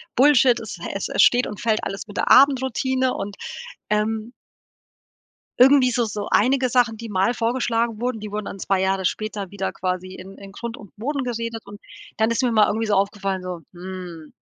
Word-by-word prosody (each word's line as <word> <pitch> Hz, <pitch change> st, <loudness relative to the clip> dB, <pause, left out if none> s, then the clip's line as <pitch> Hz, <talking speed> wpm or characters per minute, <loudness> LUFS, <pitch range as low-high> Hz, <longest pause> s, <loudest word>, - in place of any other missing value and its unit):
„Bullshit, 260 Hz, -2 st, +5 dB
es 220 Hz, -4 st, -7 dB
hä -, -, -5 dB
es 195 Hz, -, -3 dB
es -, -, +2 dB
steht 245 Hz, +1 st, +4 dB
und 210 Hz, -, -7 dB
fällt 220 Hz, -2 st, 0 dB
alles 195 Hz, +3 st, -5 dB
mit 205 Hz, -, -10 dB
der -, -, 0 dB
Abendroutine“, 260 Hz, -1 st, +3 dB
und, 200 Hz, 0 st, -5 dB, 0.5 s
ähm 215 Hz, +2 st, -1 dB, 1.3 s
irgendwie 260 Hz, 0 st, +6 dB
so 240 Hz, -1 st, +1 dB
so 210 Hz, -1 st, -4 dB
einige 255 Hz, +3 st, +3 dB
Sachen, 235 Hz, -2 st, +2 dB
die 230 Hz, -1 st, -8 dB
mal 195 Hz, +5 st, +1 dB
vorgeschlagen 230 Hz, -1 st, -1 dB
wurden, 245 Hz, -2 st, -2 dB
die 210 Hz, -1 st, -7 dB
wurden 210 Hz, -1 st, -4 dB
dann 195 Hz, -, -7 dB
2 190 Hz, 0 st, 0 dB
Jahre 190 Hz, 0 st, 0 dB
später 205 Hz, -1 st, -3 dB
wieder 195 Hz, -1 st, -3 dB
quasi 185 Hz, 0 st, -3 dB
in 190 Hz, +2 st, -11 dB
in 195 Hz, -1 st, -11 dB
Grund 235 Hz, +3 st, -6 dB
und 205 Hz, -, -14 dB
Boden 280 Hz, +4 st, -2 dB
geredet 230 Hz, -2 st, -4 dB
und 205 Hz, 0 st, -11 dB, 0.4 s
dann 220 Hz, +1 st, +2 dB
ist 255 Hz, +3 st, 0 dB
mir 245 Hz, -, +2 dB
mal 215 Hz, -2 st, +4 dB
irgendwie 225 Hz, +1 st, -1 dB
so 205 Hz, -, +2 dB
aufgefallen, 195 Hz, -1 st, -1 dB
so: 180 Hz, -2 st, -6 dB
„Hm, 175 Hz, -3 st, -9 dB
215 Hz, 195 wpm, -22 LUFS, 195-245 Hz, 1.3 s, irgendwie